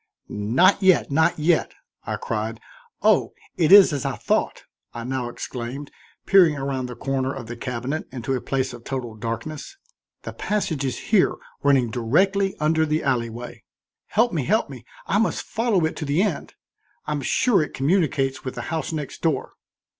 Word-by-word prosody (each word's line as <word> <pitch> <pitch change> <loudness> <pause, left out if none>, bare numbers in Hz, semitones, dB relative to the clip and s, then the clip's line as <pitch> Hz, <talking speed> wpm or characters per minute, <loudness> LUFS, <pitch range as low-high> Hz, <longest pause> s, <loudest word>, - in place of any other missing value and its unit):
"Not 130 - +3
yet, 190 -6 +4
not 160 +3 +3
yet," 160 +2 +1 0.3
I - - -1
cried. 110 +1 -3 0.4
"Oh! - - +3 0.2
it 165 -1 +2
is 195 -5 +9
as 140 - -2
I - - -2
thought," - - -1 0.3
I 120 - -5
now 125 -1 -3
exclaimed, 125 +4 -6 0.3
peering 180 -6 +5
around 135 -2 -2
the 125 - -7
corner 135 0 -1
of 135 -4 -7
the 120 +2 -7
cabinet 125 +5 -4
into 130 +1 -3
a 130 - -1
place 130 -1 -2
of 120 -1 -11
total 125 -4 -4
darkness. 115 - -6 0.5
"The - - -6
passage 180 -9 -2
is 130 -2 -2 0.2
here, 195 - +4 0.3
running 135 -5 +3
directly 190 - +1
under 160 +1 +2
the 155 0 0
alley 120 -4 0
way. 120 +2 -9 0.4
Help 230 0 +2
me, 155 -5 0
help 215 - +1
me, - - -10 0.2
I - - +1
must - - 0
follow 220 -7 +1
it 160 - -2
to 155 - -4
the 145 +7 +2
end. 200 -8 -3 0.5
I'm 150 -1 -2
sure 210 - +2
it 150 - -4
communicates 140 -3 +1
with 130 - -5
the 120 - -4
house 160 0 -2
next 150 -4 -5
door." 160 -5 -1
140 Hz, 175 wpm, -23 LUFS, 125-165 Hz, 0.5 s, is